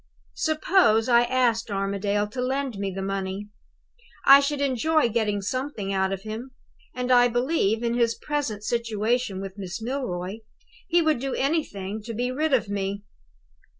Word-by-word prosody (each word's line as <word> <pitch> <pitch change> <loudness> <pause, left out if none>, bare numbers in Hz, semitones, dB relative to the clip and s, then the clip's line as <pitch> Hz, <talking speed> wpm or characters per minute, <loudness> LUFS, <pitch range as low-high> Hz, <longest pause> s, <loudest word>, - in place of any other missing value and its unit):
"Suppose 310 - +3
I 240 -1 +5
asked 240 -3 +1
Armadale 200 +1 -1
to 250 +4 -4
lend 260 -3 -2
me 200 -1 -1
the 190 0 -5
money? 195 +1 -3 0.8
I 275 +1 +10
should 285 +1 -1
enjoy 280 +1 +2
getting 210 -3 0
something 230 -3 -3
out 190 0 +1
of 195 0 -4
him; 230 +4 -7 0.4
and 250 0 -2
I 245 -1 +6
believe, 240 -3 +1
in 235 0 0
his 235 -1 +2
present 275 -9 -3
situation 230 -2 -1
with 195 +1 -8
Miss 190 +1 -5
Milroy, 220 -6 -3 0.5
he 345 -1 +3
would 310 -5 +2
do 270 +1 -3
anything 220 - -2
to 230 -1 -5
be 245 +3 -1
rid 305 +4 0
of 255 -5 +2
me. 200 0 -3
230 Hz, 155 wpm, -25 LUFS, 200-260 Hz, 0.8 s, I